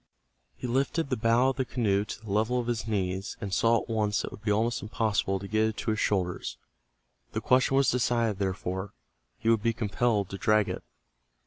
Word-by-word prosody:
He - - -7
lifted 135 +5 0
the 130 - 0
how 120 +3 +4
of 135 - -3
the 130 - +1
canoe 110 -5 0
to - - -6
the 110 -3 -8
level 110 +5 +1
of 120 - -2
his 115 -2 -2
knees, 95 -2 -2
and 100 -3 -4
saw 115 +2 +4
at - - -14
once 105 -2 0
that - - -4
it - - -25
would - - -11
be 105 -1 0
almost 115 +3 +1
impossible 105 -2 0
to 100 +1 -7
get 110 +2 +2
it 110 - -4
to 110 - -1
his 110 - -1
shoulders. 90 -3 -1 0.8
The - - 0
question 130 +1 +3
was 135 -2 +4
decided, 115 -4 +1
therefore 95 0 -3 0.4
he 115 - -1
would 115 -2 +4
be 115 +2 +1
compelled 110 -2 0
to 95 - -6
drag 105 -1 +3
it. - - -4
110 Hz, 215 wpm, -28 LUFS, 100-120 Hz, 0.8 s, how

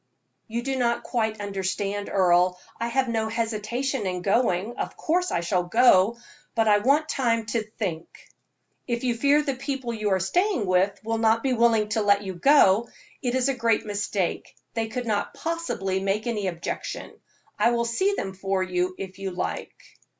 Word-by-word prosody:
"You 235 +2 -3
do 270 0 -2
not 235 -2 +1
quite 220 -3 -1
understand, 200 0 -3
Earle. 180 -1 +3 0.2
I 230 - -1
have 260 +2 +1
no 225 -1 0
hesitation 230 +2 -2
in 180 -1 -3
going. 205 +1 +1
Of - - -4
course 360 +3 0
I 170 - 0
shall 175 +1 0
go, 225 0 +4 0.4
but 225 -1 +2
I 205 -1 +5
want 285 +7 +2
time 230 -6 0
to 225 +1 -1
think." 195 -6 -4 0.8
"If 235 -1 -2
you 245 -2 +1
fear 285 +5 +3
the 280 -2 -1
people 260 -2 -4
you 215 -2 -1
are 190 -1 +2
staying 350 - +1
with 190 +2 +2
will 225 +1 -1
not 225 0 +3
be 265 -2 +1
willing 230 -3 +3
for 205 -2 +3
you 195 -2 -5
to 175 - -13
go, 235 - +5 0.3
it 245 -1 -1
is 260 0 +2
a 275 - +2
great 230 -3 +1
mistake; 205 -3 -2 0.2
they 225 -1 -1
could 245 +3 -4
not 210 -3 -1
possibly 325 - -2
make 195 +2 -1
any 215 -5 -1
objection. 170 -2 -5 0.5
I - - +5
will 235 0 +1
see 380 - +1
them 195 - -4
for 195 0 -1
you, 185 0 -1
if 190 -1 -7
you 195 -1 -3
like." 180 - -5
220 Hz, 180 wpm, -25 LUFS, 195-245 Hz, 0.8 s, I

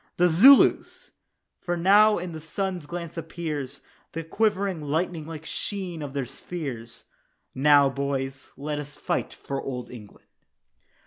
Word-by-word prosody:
The 180 0 +4
Zulus! 250 +12 +5 0.5
for 175 -1 -2
now 205 +5 +5
in 175 0 -5
the 160 -1 -7
sun's 180 0 -4
glance 170 0 -6
appears 150 -5 -5 0.3
The 165 - -4
quivering 195 -1 0
lightning 160 +2 -2
like 160 -1 -8
sheen 185 -5 -4
of 145 -1 -6
their 140 -2 -1
spears. 120 -7 -7 0.5
"Now, 145 +1 +5
boys, 135 0 -3
let 150 +1 -3
us 145 0 -8
fight - - -2
for 135 -1 -5
Old 125 -2 -6
England." 110 -5 -13
160 Hz, 135 wpm, -26 LUFS, 140-175 Hz, 0.5 s, Zulus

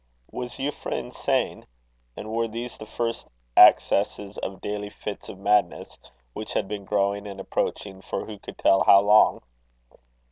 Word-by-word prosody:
Was 125 -1 -5
Euphra 145 +2 -4
insane? - - -2 0.5
and 110 - -7
were 115 +1 0
these 115 +2 -6
the 110 - -11
first 115 +1 -3 0.3
accesses 100 0 +4
of 95 - -6
daily 105 0 -4
fits 105 0 -8
of - - -9
madness, 105 +1 +1 0.4
which 110 - -6
had - - -1
been 100 -1 -6
growing 100 0 0
and 100 -1 -8
approaching 95 0 -3
for - - -4
who 105 -2 -9
could - - -11
tell 95 - +4
how 100 - +7
long? 105 +2 +4
105 Hz, 150 wpm, -25 LUFS, 100-110 Hz, 0.5 s, how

